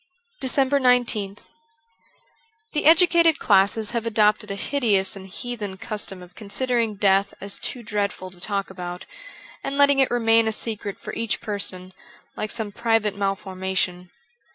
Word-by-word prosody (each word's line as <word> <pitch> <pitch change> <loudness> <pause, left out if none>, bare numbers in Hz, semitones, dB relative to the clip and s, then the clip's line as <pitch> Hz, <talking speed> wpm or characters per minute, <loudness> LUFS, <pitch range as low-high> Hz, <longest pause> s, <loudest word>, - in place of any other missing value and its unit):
391 260 -1 +3
DECEMBER 200 -2 -4
19th - - -25 1.2
THE 300 - -1
educated 335 0 +6
classes 205 +2 +2
have 235 -1 -2
adopted 210 -1 +2
a 200 - -3
hideous 205 -5 +1
and 190 -1 -9
heathen 205 -1 -5
custom 195 -3 -4
of 180 0 -15
considering 230 +2 -1
death 195 0 +2
as 200 0 -2
too 245 - -5
dreadful 200 -3 -3
to 180 - -18
talk 200 -1 -3
about, 180 -1 -7 0.6
and 275 0 -3
letting 285 -1 +5
it 265 - +4
remain 230 -1 +3
a - - +1
secret 215 -2 -4
for - - -8
each 230 -2 -1
person, 195 -4 -3 0.4
like 215 - -3
some 215 -1 -4
private 225 -2 +1
mal 195 -1 0
formation. 185 -2 -3
210 Hz, 150 wpm, -23 LUFS, 195-240 Hz, 1.2 s, educated